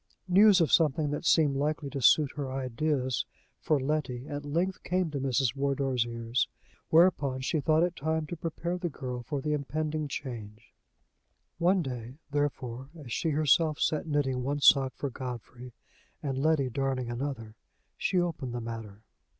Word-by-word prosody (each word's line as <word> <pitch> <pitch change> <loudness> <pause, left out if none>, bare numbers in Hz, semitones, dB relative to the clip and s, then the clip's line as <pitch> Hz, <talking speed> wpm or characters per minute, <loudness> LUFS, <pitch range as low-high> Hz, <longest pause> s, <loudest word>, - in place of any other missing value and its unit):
News 195 +2 +6
of 165 - +2
something 150 -2 +3
that 145 +3 -2
seemed 150 -4 +4
likely 150 +1 -1
to 140 - -4
suit 145 +3 +5
her 140 -3 -4
ideas 130 0 -1 0.4
for 155 -2 +1
Letty 130 -3 -2
at 145 0 -5
length 170 +6 -1
came 180 -2 0
to 140 - -3
Mrs. 135 -1 +1
Wardour's 135 -3 0
ears, 115 +1 -1 0.4
whereupon 155 -6 +4
she 155 +4 0
thought 155 +2 +3
it 175 -1 0
time 160 +1 -1
to 175 - -6
prepare 170 +2 -3
the 175 -1 -2
girl 125 -4 -5
for 140 +3 -4
the 150 +2 -1
impending 150 +1 -2
change. 115 -6 -7 0.9
One 180 +1 +3
day, 125 -1 -6
therefore, 135 -3 -2
as 140 -8 -7
she 165 - 0
herself 155 +1 +3
sat 155 +1 0
knitting 140 -4 0
one 140 +3 -1
sock 135 -2 +5
for 140 - -4
Godfrey, 125 0 -7 0.5
and 135 -2 -1
Letty 140 -2 +2
darning 130 -1 -1
another, 120 -3 -4 0.4
she 185 - +1
opened 150 -8 -2
the - - -2
matter. 115 -3 -7
140 Hz, 160 wpm, -29 LUFS, 125-155 Hz, 0.9 s, News